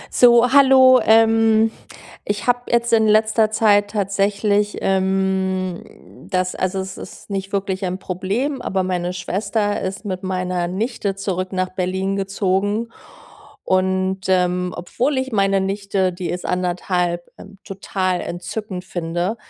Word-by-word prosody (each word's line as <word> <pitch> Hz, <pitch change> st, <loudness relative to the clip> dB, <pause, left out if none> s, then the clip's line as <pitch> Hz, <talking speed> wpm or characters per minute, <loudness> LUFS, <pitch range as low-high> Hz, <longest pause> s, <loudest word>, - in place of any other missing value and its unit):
So, 240 Hz, +1 st, +5 dB
hallo, 260 Hz, -2 st, +7 dB
ähm, 225 Hz, 0 st, +4 dB, 0.5 s
ich 205 Hz, 0 st, -3 dB
habe 245 Hz, 0 st, 0 dB
jetzt 235 Hz, 0 st, +1 dB
in 220 Hz, -1 st, +4 dB
letzter 215 Hz, +1 st, +3 dB
Zeit 205 Hz, -2 st, +3 dB
tatsächlich, 205 Hz, 0 st, 0 dB
ähm, 190 Hz, -2 st, -2 dB
das 185 Hz, -1 st, 0 dB
also, 185 Hz, +1 st, -2 dB
es 190 Hz, 0 st, -8 dB
ist -, -, -11 dB
nicht 195 Hz, 0 st, -4 dB
wirklich 195 Hz, -1 st, -2 dB
ein 185 Hz, 0 st, -2 dB
Problem, 205 Hz, +10 st, -3 dB
aber 190 Hz, -4 st, -1 dB
meine 180 Hz, -1 st, -2 dB
Schwester 205 Hz, +3 st, -2 dB
ist 190 Hz, +3 st, -5 dB
mit 185 Hz, -2 st, -4 dB
meiner 185 Hz, -2 st, -2 dB
Nichte 200 Hz, +1 st, -2 dB
zurück 190 Hz, -2 st, -3 dB
nach 185 Hz, -1 st, -1 dB
Berlin 190 Hz, +1 st, -2 dB
gezogen, 200 Hz, +3 st, -1 dB, 0.7 s
und, 190 Hz, 0 st, 0 dB
ähm, 180 Hz, -1 st, +1 dB
obwohl 255 Hz, +10 st, -1 dB
ich 260 Hz, 0 st, -2 dB
meine 195 Hz, -2 st, +2 dB
Nichte 195 Hz, -1 st, -1 dB
die 180 Hz, 0 st, -5 dB
ist 180 Hz, -, -4 dB
1,5, 180 Hz, -1 st, -1 dB
ähm, 195 Hz, 0 st, -13 dB
total 185 Hz, -2 st, -2 dB
entzückend 185 Hz, +1 st, -6 dB
finde, 175 Hz, +4 st, -3 dB
195 Hz, 130 wpm, -20 LUFS, 185-215 Hz, 0.7 s, hallo